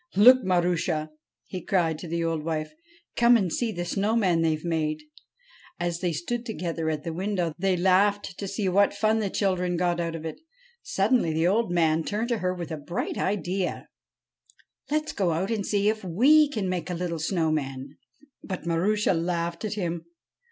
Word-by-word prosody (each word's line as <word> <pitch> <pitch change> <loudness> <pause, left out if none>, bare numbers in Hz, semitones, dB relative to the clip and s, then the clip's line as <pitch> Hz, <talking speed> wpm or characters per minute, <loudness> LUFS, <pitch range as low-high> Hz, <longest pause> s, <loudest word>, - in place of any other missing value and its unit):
'Look, 250 +6 +8
Marushal' 175 -4 0 0.4
he 185 - -6
cried 165 -6 +1
to 175 - -7
the 170 +1 -1
old 165 -2 -1
wile. 155 -1 -1 0.5
'Come 240 0 +6
and 190 -6 -1
see 235 -2 0
the 175 -3 -4
snow 205 +5 0
man 185 -7 +2
they've 160 0 0
made.' 155 -2 -1 0.8
As 175 -1 -2
they 180 -1 0
stood 200 +10 -3
together 170 -8 -3
at 155 -1 -3
the 165 - -4
window, 180 -2 -1
they 190 0 +1
laughed 195 +2 +2
to 200 - -3
see 195 +1 -2
what 200 +2 +3
fun 215 +2 +2
the 205 -2 -1
children 180 -3 0
got 175 0 +1
out 165 -1 -2
of 165 -1 -7
it. 160 - -5 0.4
Suddenly 230 -11 +1
the 160 +1 +1
old 210 +3 +2
man 165 -2 +2
turned 220 +6 -2
to 235 -3 0
her 180 -1 0
with 175 -2 -6
a 160 - -3
bright 225 - -4
idea. 190 -1 -2 0.5
' - - -34
Let 305 +1 +1
*s 310 - -6
go 185 -5 0
out 185 +7 -1
and 215 -3 -1
see 205 0 +1
if 215 0 0
we 275 - +5
can't 215 -8 -2
make 180 -2 -2
a 180 - -2
little 170 -1 -3
snow 160 0 0
man.' 135 -2 -4 0.5
But 185 -2 -5
Marusha 190 +5 +1
laughed 170 +1 -2
at 210 - -3
him. 170 -4 -3
180 Hz, 195 wpm, -26 LUFS, 165-205 Hz, 0.8 s, Look